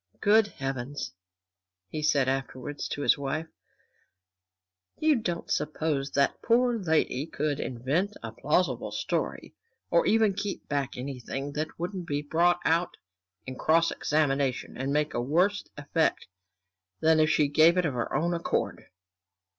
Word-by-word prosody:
Good 215 +1 +5
Heavens," 135 - -5 0.8
he 155 - -4
said 145 -3 +2
afterwards 135 +1 -3
to 145 - -4
his - - +4
wife, 140 +3 -2 1.5
"you 310 -1 +3
don't 180 -8 -3
suppose 150 -2 -1
that 140 0 +3
the - - -18
poor 240 0 +3
lady 160 -5 +1
could 150 -2 -2
invent 145 - -1
a - - -5
plausible - - 0
story, - - -3 0.4
or - - +4
even 220 -2 +4
keep 205 0 -4
back 140 -3 -2
anything 135 +2 -5
that 155 +2 -4
wouldn't 175 +1 -4
be 145 -1 -1
brought 170 +4 +2
out 165 +2 +1 0.5
in 130 -1 -7
cross 165 +1 +3
examination 140 -4 0
and 135 +2 -2
make 150 +1 0
a - - -1
worse 180 +11 +2
effect 145 +3 0 0.7
than 160 0 +4
if 155 0 +4
she 150 -2 +3
gave 160 +4 +5
it 180 - +2
of 145 - 0
her 120 -1 -2
own 170 +2 +1
accord!" 170 0 -2
155 Hz, 145 wpm, -28 LUFS, 140-175 Hz, 1.5 s, Good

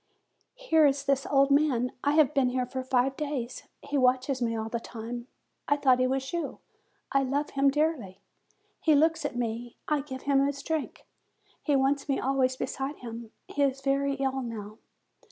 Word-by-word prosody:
Here 325 -12 +4
is 275 0 0
this 275 -1 +1
old 275 0 +3
man. 275 -4 +3
I 285 - +2
have 300 -2 +4
been 270 -3 +3
here 250 0 -1
for 260 +1 -4
five 260 +1 +1
days. 275 -5 -4 0.2
He 285 - -1
watches 255 +1 +2
me 230 -1 0
all 220 0 -3
the 235 +1 -3
time. 235 +1 -7 0.4
I 285 - +3
thought 260 -3 +4
he 255 - +3
was 265 +2 -2
you. 340 -1 -3 0.5
I 275 - +3
love 275 +2 -1
him 275 0 +3
dearly. 275 - -1 0.6
He 310 -2 +4
looks 320 +3 +3
at - - -3
me; 235 0 -3
I 300 -2 +1
give 260 -2 -8
him 275 -1 +3
his 280 0 -2
drink; 315 -2 -3 0.6
he 290 - +1
wants 275 +2 +1
me 275 - +1
always 260 -1 +1
beside 270 +2 -3
him; 230 -1 -8 0.2
he 290 - -3
is 270 -1 +1
very 275 0 +1
ill 270 -1 -1
now. 220 -3 -7
270 Hz, 185 wpm, -28 LUFS, 250-285 Hz, 0.6 s, Here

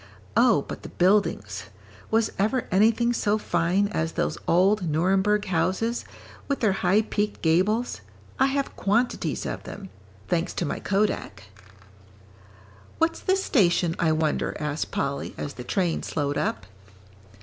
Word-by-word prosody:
"Oh, 230 - +4
but - - -8
the - - -9
buildings 195 +3 +1 0.4
was 225 0 +2
ever 225 +5 +1
anything 225 +5 +3
so 210 -2 +1
fine 180 0 +1
as 165 -5 -2
those - - -1
old 185 +1 +3
Nuremberg 190 +6 +2
houses, 190 +6 0 0.4
with 280 - -1
their 215 -4 +3
high 190 +3 +2
peaked 210 -1 -2
gables! 195 +9 +1 0.4
I 265 - +5
have 275 0 -2
quantities 230 +5 0
of - - -4
them 195 -2 -9 0.4
thanks 170 -1 0
to 175 - -1
my - - -3
kodak." 195 - -1 1.5
"What's 330 0 +1
this 380 +1 +1
station, 175 - +2
I 165 -2 +3
wonder?" 155 -1 0
asked 150 0 -2
Polly, 140 0 -3
as 145 - -5
the 125 - -8
train 175 +5 0
slowed 145 -1 -2
up. 105 -8 -2
195 Hz, 140 wpm, -25 LUFS, 165-220 Hz, 1.5 s, I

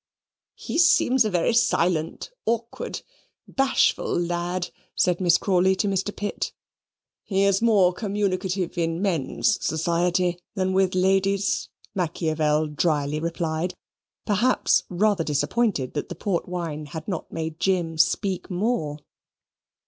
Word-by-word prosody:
"He - - -3
seems 265 -7 +5
a - - +1
very 180 +4 +1
silent, 180 - +1 0.2
awkward, 230 0 -3 0.4
bashful 270 -9 +1
lad," 175 +1 -2 0.2
said 180 0 +1
Miss 175 -1 +5
Crawley 190 -1 +2
to 205 - 0
Mr. 195 +1 -1
Pitt. 205 0 -3 0.7
"He 195 -1 +1
is 200 0 +3
more 200 -6 +4
communicative 190 -3 -2
in 165 0 0
men's 190 - 0
society 175 +2 +1 0.2
than 190 -1 0
with 190 -1 +2
ladies," 195 +1 +1 0.2
Machiavel 155 -3 0
dryly 150 -1 0
replied: 165 +1 -2 0.5
perhaps 230 +5 +2
rather 195 0 +2
disappointed 150 - 0
that 145 - -3
the 175 - -5
port 175 0 -2
wine 165 -4 -4
had 160 +2 -7
not 185 -6 -4
made 160 0 -4
Jim 170 -4 0
speak 190 +3 +1
more. 180 -6 -1
180 Hz, 120 wpm, -24 LUFS, 165-200 Hz, 0.7 s, seems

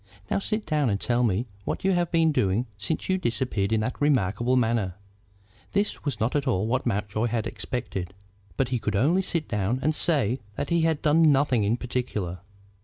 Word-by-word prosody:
Now - - +2
sit 215 +2 -2
down 150 -5 +1
and 100 -1 0
tell 120 +3 +1
me 110 +1 +1 0.2
what - - -3
you 195 - +3
have 175 -2 +1
been 165 -1 +4
doing 105 -3 +1
since 105 - -3
you 190 0 +1
disappeared 120 - -1
in 110 -1 +2
that 125 +6 -3
remarkable 120 -3 +2
manner." 115 -7 +1 0.8
This 200 +1 0
was 140 -7 -2
not 115 +6 0
at 145 -1 0
all 105 -5 +1
what 125 +3 0
Mountjoy 105 +1 0
had 115 -1 -1
expected, 95 -7 -4 0.4
but 130 -2 +1
he 125 -2 0
could 105 -2 -2
only 155 - +3
sit 170 -5 -2
down 105 +3 0
and 155 - +2
say 135 -7 +1 0.2
that - - -3
he 170 -1 +3
had 160 -2 +1
done 155 +1 +5
nothing 135 -5 +3
in 110 +4 +1
particular. 110 -8 -3
125 Hz, 195 wpm, -26 LUFS, 105-150 Hz, 0.8 s, done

